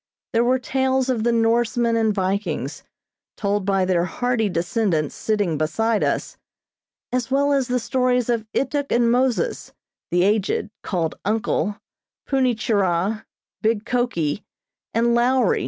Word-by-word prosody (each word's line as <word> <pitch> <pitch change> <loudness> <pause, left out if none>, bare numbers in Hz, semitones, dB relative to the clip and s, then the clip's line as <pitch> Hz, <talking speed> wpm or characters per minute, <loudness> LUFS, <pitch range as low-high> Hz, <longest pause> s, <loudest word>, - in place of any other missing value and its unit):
There 230 +1 +3
were 255 +2 +3
tales 265 0 0
of 235 -4 0
the 235 - +2
Norsemen 230 +1 +2
and 220 -1 +2
Vikings, 185 - -2 0.6
told 200 -1 -1
by 195 -1 +2
their 180 -2 +2
hardy 235 +3 0
descendants 170 -3 0
sitting 205 -8 -1
beside 215 +8 +1
us, - - -1 0.7
as 250 -1 -1
well 280 +2 +2
as 270 -3 +1
the 250 0 +1
stories 250 0 +1
of 230 -3 -1
Ituk 285 0 -1
and 235 -1 +3
Moses, 260 - 0 0.4
the 175 0 +2
aged, 210 +1 +1
called 170 -5 -2
"Uncle," 210 0 -1 0.5
Punni 260 -3 +2
Churah, 205 -1 0 0.4
big 220 0 +1
Koki, 230 -11 -1 0.5
and 235 +1 +2
"Lowri." 245 -2 +3
225 Hz, 135 wpm, -22 LUFS, 195-250 Hz, 0.7 s, There